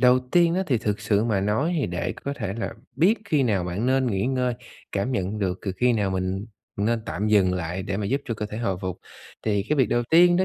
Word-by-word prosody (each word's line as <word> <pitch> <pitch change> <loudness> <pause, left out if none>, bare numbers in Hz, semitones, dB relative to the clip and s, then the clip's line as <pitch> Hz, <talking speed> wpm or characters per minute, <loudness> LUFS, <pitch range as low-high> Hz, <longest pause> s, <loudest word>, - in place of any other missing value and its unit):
đầu 125 0 +6
tiên 170 -1 +5
á, 190 - +1
thì 125 -5 +2
thực 105 -2 -2
sự 105 0 +2
mà 105 -4 +1
nói 110 - +1
thì - - 0
để 90 0 -2
có 140 - -5
thể 110 -9 -4
là 115 - -4 0.2
biết 185 +7 +5
khi 150 -8 +2
nào 105 -8 +1
bạn 90 +7 -2
nên 130 0 +3
nghỉ 100 -1 0
ngơi, 125 -2 0 0.4
cảm 100 +6 -1
nhận 100 -1 -1
được 95 -2 -1
cừ 100 - -2
khi 125 +5 +3
nào 105 -4 +1
mình 95 +2 -2 0.3
nên 115 +3 +1
tạm 105 +4 -1
dừng 95 -4 +4
lại 90 +1 -3
để 95 0 -3
mà 100 -1 -2
giúp 135 +6 0
cho 115 - -3
cơ 105 -1 -4
thể 105 +1 -6
hồi 100 -6 -1
phục, 95 -2 -4 0.4
thì 105 -2 +1
cái 150 - +2
việc 130 -3 +4
đầu 120 - +2
tiên 175 +1 +7
đó 185 - +3
110 Hz, 260 wpm, -25 LUFS, 95-130 Hz, 0.4 s, tiên